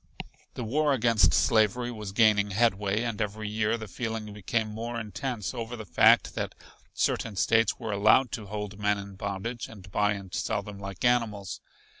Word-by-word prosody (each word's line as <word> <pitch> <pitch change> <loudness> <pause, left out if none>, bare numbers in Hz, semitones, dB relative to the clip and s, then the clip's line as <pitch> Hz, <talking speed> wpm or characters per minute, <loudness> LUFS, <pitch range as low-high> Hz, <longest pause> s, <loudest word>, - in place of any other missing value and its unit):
The 125 - -4
war 145 +6 +2
against 115 -4 +4
slavery 115 +2 +2
was 105 -4 -6
gaining 105 -1 +4
headway, 105 0 +1
and 115 -3 -3
every 105 +1 -3
year 105 +2 0
the 110 -1 -7
feeling 110 0 -4
became 110 +2 -1
more 115 +2 -4
intense 110 +1 -4
over 120 -1 -5
the 110 -2 -8
fact - - +5
that - - -4 0.4
certain 110 - -1
States 115 +4 +3
were 110 - -4
allowed 110 +6 +4
to 110 -6 -5
hold 105 0 -5
men 105 0 +2
in 100 0 -8
bondage 100 +4 -4
and 100 -4 -13
buy 105 +2 +2
and 100 -3 -9
sell 100 - -1
them 100 0 -9
like 100 +1 -5
animals. 115 -5 0
105 Hz, 175 wpm, -28 LUFS, 100-115 Hz, 0.4 s, fact